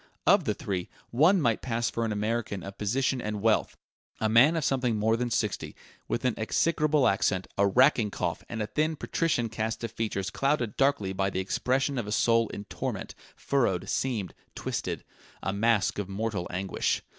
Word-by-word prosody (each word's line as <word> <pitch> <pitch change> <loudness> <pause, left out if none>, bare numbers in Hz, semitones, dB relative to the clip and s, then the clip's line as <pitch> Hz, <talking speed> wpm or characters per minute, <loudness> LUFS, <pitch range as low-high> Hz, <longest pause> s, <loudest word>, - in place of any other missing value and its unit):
Of - - +5
the - - 0
three, 90 -3 -3 0.2
one 160 +11 +5
might 115 -8 +1
pass 115 -1 -1
for 115 - -2
an 110 - -1
American 105 -2 -2
of 100 0 -9
position 125 +5 0
and 105 -1 -3
wealth: 110 +1 +1 0.4
a 110 - +1
man 120 +9 +6
of 165 - 0
something 125 -4 +1
more 110 +1 +2
than 120 +1 -1
sixty 110 -3 -1
years, - - -14 0.3
with 120 - -2
an 125 - +3
execrable 150 +4 +2
accent, 95 -1 +1
a 100 0 +3
racking 120 0 +4
cough, 90 -4 -3
and 110 -2 -2
a - - -1
thin, 155 +7 0
patrician 155 -6 0
cast 110 +1 -3
of 115 - -3
features 100 -4 -2
clouded 135 -4 0
darkly 135 -9 +1
by 95 0 0
the 95 - -3
expression 130 +8 0
of 110 - -4
a - - -4
soul 115 +1 +3
in 100 - -7
torment, - - -4 0.2
furrowed, 120 -10 0
seamed, 115 -9 -1 0.2
twisted - - -3 0.4
a 95 - -1
mask 110 0 +2
of 100 -2 -4
mortal 100 -2 -2
anguish. 95 +1 -1
115 Hz, 185 wpm, -28 LUFS, 100-130 Hz, 0.4 s, man